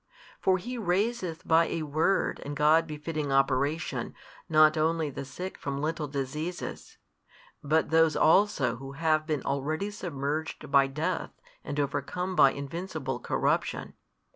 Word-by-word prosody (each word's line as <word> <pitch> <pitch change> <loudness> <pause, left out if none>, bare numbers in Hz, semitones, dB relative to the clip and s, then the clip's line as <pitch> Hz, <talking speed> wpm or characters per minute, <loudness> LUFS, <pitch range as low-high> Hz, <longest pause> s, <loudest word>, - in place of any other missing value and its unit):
For 190 -1 +3
He 245 +7 -5
raiseth 185 -3 -1
by 165 +1 +5
a 165 - -2
word 160 +6 +1
and 145 +1 -5
God 155 +2 +4
befitting 150 -1 -4
Operation 135 +3 0 0.3
not 155 0 +6
only 160 -1 +1
the 135 - -6
sick 180 +8 -7
from 140 -1 -3
little 155 0 -2
diseases, 150 +5 -5 0.7
but 155 +3 +1
those 165 -1 +4
also 175 - +3
who 135 +2 -8
have 155 +1 +1
been 150 -3 -1
already 155 +9 -2
submerged 155 -6 -4
by 140 -1 +5
death 150 +4 -3 0.2
and 145 - -4
overcome 145 +6 -2
by 135 -5 +6
invincible 140 -3 -4
corruption. - - -1
155 Hz, 135 wpm, -28 LUFS, 140-165 Hz, 0.7 s, not